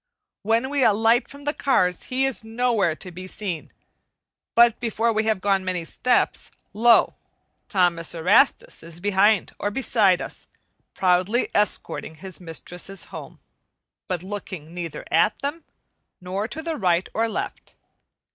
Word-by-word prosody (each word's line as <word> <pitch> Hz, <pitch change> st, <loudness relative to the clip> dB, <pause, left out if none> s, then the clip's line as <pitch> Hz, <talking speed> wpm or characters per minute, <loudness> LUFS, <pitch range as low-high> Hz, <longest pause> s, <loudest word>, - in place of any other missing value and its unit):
When 230 Hz, +5 st, +1 dB
we 285 Hz, -2 st, +2 dB
alight 225 Hz, +3 st, +3 dB
from 280 Hz, 0 st, -12 dB
the 295 Hz, +1 st, -1 dB
cars 180 Hz, -13 st, +1 dB
he 260 Hz, +1 st, 0 dB
is 270 Hz, -4 st, -2 dB
nowhere 225 Hz, -6 st, +1 dB
to 185 Hz, +3 st, -9 dB
be 185 Hz, +2 st, -8 dB
seen. 185 Hz, -5 st, -5 dB, 0.8 s
But 235 Hz, 0 st, +6 dB
before 230 Hz, 0 st, 0 dB
we 215 Hz, 0 st, 0 dB
have 220 Hz, -3 st, +1 dB
gone 195 Hz, -1 st, +2 dB
many 180 Hz, -2 st, -2 dB
steps, 250 Hz, +9 st, 0 dB, 0.2 s
lo! 230 Hz, +2 st, +5 dB, 0.6 s
Thomas 175 Hz, -6 st, +1 dB
Erastus 185 Hz, -, +3 dB
is 165 Hz, 0 st, -8 dB
behind 205 Hz, +2 st, +2 dB
or 205 Hz, -, 0 dB
beside 205 Hz, -5 st, +2 dB
us, -, -, -8 dB, 0.5 s
proudly 185 Hz, +6 st, +2 dB
escorting 205 Hz, -5 st, -1 dB
his 185 Hz, +3 st, -11 dB
mistresses 175 Hz, +3 st, -6 dB
home, -, -, -9 dB, 0.7 s
but 180 Hz, -2 st, -3 dB
looking 185 Hz, -5 st, -7 dB
neither 170 Hz, -4 st, -6 dB
at 165 Hz, +7 st, +3 dB
them, 295 Hz, +4 st, -3 dB, 0.5 s
nor 190 Hz, +4 st, -3 dB
to 315 Hz, +6 st, -7 dB
the 330 Hz, -1 st, -3 dB
right 180 Hz, -3 st, +1 dB
or 225 Hz, +1 st, +1 dB
left. -, -, -5 dB
205 Hz, 140 wpm, -24 LUFS, 180-235 Hz, 0.8 s, But